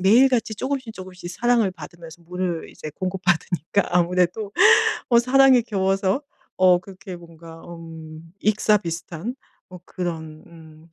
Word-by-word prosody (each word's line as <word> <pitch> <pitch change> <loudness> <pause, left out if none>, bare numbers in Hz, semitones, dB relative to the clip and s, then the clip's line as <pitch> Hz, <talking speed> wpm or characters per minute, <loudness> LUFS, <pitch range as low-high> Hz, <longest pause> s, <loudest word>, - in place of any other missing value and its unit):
매일같이 230 +3 +4
쪼금씩, 260 0 -4
쪼금씩 185 -2 -9
사랑을 235 0 +2
받으면서 170 -2 -12
물을 180 -1 -4
이제 155 - -9
공급받으니까 180 0 0
아무래도 180 +4 +1 0.6
어 235 - +5
사랑에 260 +1 +5
겨워서 195 +2 0 0.3
어 185 -1 +5
그렇게 190 0 -10
뭔가 165 -1 -13
음 165 -1 -11
익사 215 0 +3
비슷한 170 +5 -5 0.3
뭐 180 -1 -11
그런 160 -4 -6
음 160 -1 -16
180 Hz, 295 characters per minute, -23 LUFS, 165-210 Hz, 0.6 s, 어